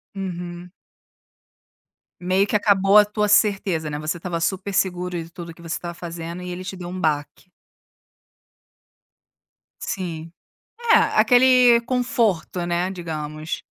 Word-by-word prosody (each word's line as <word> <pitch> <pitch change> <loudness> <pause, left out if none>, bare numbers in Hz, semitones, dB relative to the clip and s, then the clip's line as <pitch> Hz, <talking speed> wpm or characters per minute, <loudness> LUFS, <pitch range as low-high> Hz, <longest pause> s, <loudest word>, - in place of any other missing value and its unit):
Uhum. 175 -2 -6 1.5
Meio 185 +2 +2
que 210 - -2
acabou 200 -1 +4
a 210 - +8
tua 210 0 -1
certeza, 195 -6 +2
né. 145 - -4
Você 155 +3 -3
estava 170 -1 -4
super 190 +3 -2
seguro 180 -2 -1
e 165 0 -6
tudo 170 -1 -9
o - - -8
que 170 - -18
você 165 -1 -4
estava 170 0 -6
fazendo 170 +1 -7
e 180 - -6
ele 180 +1 -6
te 190 - -6
deu 180 -1 -8
um 185 +1 -6
baque. 155 +3 -2 2.3
Sim, 165 -4 -5 0.6
é - - +8
aquele 250 - +5
conforto, 225 -9 0
né. 175 +2 -1
Digamos. 155 -3 -5
180 Hz, 135 wpm, -22 LUFS, 170-200 Hz, 2.3 s, a